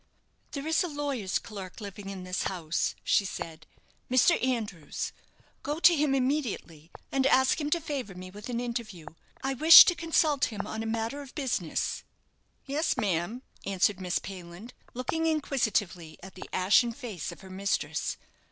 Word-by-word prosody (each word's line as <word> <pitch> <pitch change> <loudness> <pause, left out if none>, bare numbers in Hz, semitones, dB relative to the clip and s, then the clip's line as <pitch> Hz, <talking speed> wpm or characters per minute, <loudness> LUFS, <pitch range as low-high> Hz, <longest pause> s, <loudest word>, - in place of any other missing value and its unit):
"There 280 0 -4
is 320 +2 +2
a - - -2
lawyer's 280 - -2
clerk 195 -3 -8
living 200 -1 -8
in 190 -2 -6
this 185 0 -2
house," 170 -4 -1
she - - +3
said; 160 -4 -7 0.4
"Mr. 255 +6 +4
Andrews. 220 - -2 0.5
Go 295 +2 -3
to 345 0 +7
him 290 -2 +2
immediately, 250 - -2 0.2
and 270 0 +2
ask 265 +3 +3
him 295 - -1
to 340 - +2
favour 280 - -5
me 185 0 -9
with 210 +4 -9
an 235 -1 -2
interview. 230 -8 -5 0.4
I 270 0 0
wish 315 +6 +11
to 355 - +3
consult 325 -4 +2
him 210 -4 -5
on 220 - -4
a 225 - -3
matter 230 +5 -2
of 275 -2 -12
business." 245 - -2 0.6
"Yes, 295 +4 0
ma'am," 195 +6 -1 0.2
answered 195 0 +1
Miss 180 -1 0
Payland, 185 +4 -9 0.2
looking 320 +6 -1
inquisitively 220 - -1
at 190 - -10
the 185 - -10
ashen 210 +6 +3
face 225 - -6
of - - -12
her 190 -1 -12
mistress. 195 +2 -2
230 Hz, 160 wpm, -29 LUFS, 185-280 Hz, 0.6 s, wish